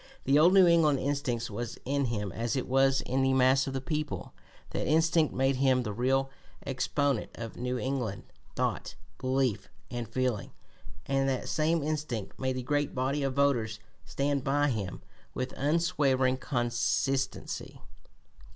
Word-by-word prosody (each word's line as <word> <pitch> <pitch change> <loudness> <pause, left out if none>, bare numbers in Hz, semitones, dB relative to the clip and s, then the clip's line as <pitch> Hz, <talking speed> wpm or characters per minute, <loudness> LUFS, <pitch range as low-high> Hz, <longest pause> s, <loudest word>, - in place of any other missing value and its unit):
The 140 +2 +4
old 175 +5 +6
New 190 -2 +8
England 165 -4 +4
instinct 130 -5 -2
was 120 +3 -5
in 140 +1 +1
him 105 -5 -2
as 115 +6 -2
it 130 - -2
was 135 +1 +3
in 130 +2 -1
the 135 0 +3
mass 130 +1 +4
of 135 - -3
the 135 - -2
people; 150 +1 -3 0.4
that - - -2
instinct 160 0 +3
made 135 0 +1
him 130 -1 +3
the 105 -3 -4
real 135 +4 +1 0.3
exponent 140 -1 0
of 115 -1 -7
New 125 +1 -2
England 125 -7 -2 0.3
thought, - - -2 0.2
belief, 130 -4 0 0.2
and 120 -3 -4
feeling, 125 -3 -1 0.5
and 135 0 +1
that 130 -2 -2
same 160 0 +1
instinct 145 -10 -3
made 130 0 -1
the 130 - -3
great 145 +2 -1
body 135 +3 0
of 135 -2 -1
voters 120 -7 +1 0.3
stand 140 +6 -1
by 145 +1 +2
him 105 -7 -4 0.3
with 130 0 -3
unswerving 140 -4 +2
constancy. 130 +1 -1
135 Hz, 150 wpm, -29 LUFS, 125-140 Hz, 0.5 s, New